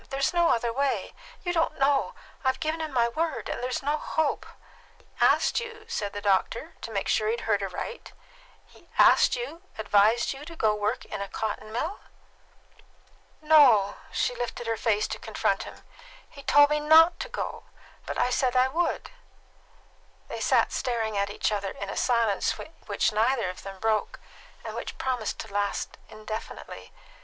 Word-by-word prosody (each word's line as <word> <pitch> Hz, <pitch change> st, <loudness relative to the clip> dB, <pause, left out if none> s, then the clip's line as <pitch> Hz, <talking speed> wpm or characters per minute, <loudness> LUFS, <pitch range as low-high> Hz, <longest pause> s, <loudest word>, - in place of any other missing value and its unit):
There's 275 Hz, +4 st, 0 dB
no 345 Hz, -1 st, +3 dB
other 235 Hz, 0 st, +1 dB
way. 275 Hz, +2 st, -1 dB, 0.3 s
You 350 Hz, -2 st, -1 dB
don't 330 Hz, -1 st, 0 dB
know. 275 Hz, 0 st, +2 dB, 0.3 s
I've 260 Hz, 0 st, +1 dB
given 315 Hz, 0 st, -2 dB
him 315 Hz, -1 st, -4 dB
my 240 Hz, -3 st, +3 dB
word, 315 Hz, +7 st, -2 dB
and -, -, -4 dB
there 250 Hz, -, -2 dB
is 255 Hz, -, -3 dB
no 295 Hz, +2 st, +1 dB
hope!" 315 Hz, -1 st, -1 dB, 0.5 s
"He -, -, -26 dB, 0.2 s
asked -, -, +4 dB
you," 465 Hz, -2 st, -8 dB
said 205 Hz, -, -3 dB
the 205 Hz, -, -6 dB
doctor, 205 Hz, -, 0 dB
to -, -, -6 dB
make 200 Hz, -3 st, -2 dB
sure 215 Hz, -, +2 dB
he 220 Hz, -, +2 dB
had 235 Hz, -, -4 dB
heard 205 Hz, -2 st, +1 dB
aright 195 Hz, -, -5 dB, 0.5 s
"he -, -, -22 dB
asked -, -, +6 dB
you 485 Hz, -9 st, -6 dB, 0.2 s
advised 220 Hz, +3 st, +3 dB
you 275 Hz, +2 st, -10 dB
to 330 Hz, +2 st, -10 dB
go 220 Hz, -8 st, +2 dB
to 210 Hz, 0 st, -4 dB
work 205 Hz, -, -1 dB
in -, -, -6 dB
a 200 Hz, -, -3 dB
cotton 215 Hz, +1 st, -4 dB
mill?" 315 Hz, -, -3 dB, 1.4 s
"No;" 255 Hz, -11 st, +6 dB
she -, -, 0 dB
lifted 240 Hz, 0 st, -4 dB
her 230 Hz, 0 st, 0 dB
face 215 Hz, -2 st, +1 dB
to -, -, -4 dB
confront -, -, -1 dB
him. -, -, -15 dB, 0.4 s
"He 280 Hz, -, -13 dB
told 290 Hz, +2 st, +5 dB
me 300 Hz, -, +2 dB
not 320 Hz, +3 st, +6 dB
to -, -, -5 dB
go; 485 Hz, -, -5 dB, 0.4 s
but -, -, -3 dB
I 250 Hz, -, +2 dB
said 255 Hz, 0 st, +1 dB
I 255 Hz, +1 st, +4 dB
would." 345 Hz, +5 st, -1 dB, 1.2 s
They -, -, -5 dB
sat -, -, +3 dB
staring 225 Hz, -4 st, -1 dB
at 200 Hz, 0 st, 0 dB
each 205 Hz, -, -1 dB
other 200 Hz, -2 st, -1 dB
in 200 Hz, +1 st, -6 dB
a -, -, -6 dB
silence 230 Hz, -5 st, +1 dB, 0.3 s
which 210 Hz, +1 st, +1 dB
neither 225 Hz, -2 st, +1 dB
of 185 Hz, -, -12 dB
them 195 Hz, -1 st, -8 dB
broke, 220 Hz, 0 st, 0 dB, 0.5 s
and -, -, -5 dB
which -, -, -6 dB
promised 250 Hz, -5 st, -2 dB
to 220 Hz, -3 st, -11 dB
last 205 Hz, 0 st, -2 dB
indefinitely. 215 Hz, +1 st, -8 dB
240 Hz, 180 wpm, -27 LUFS, 215-300 Hz, 1.4 s, asked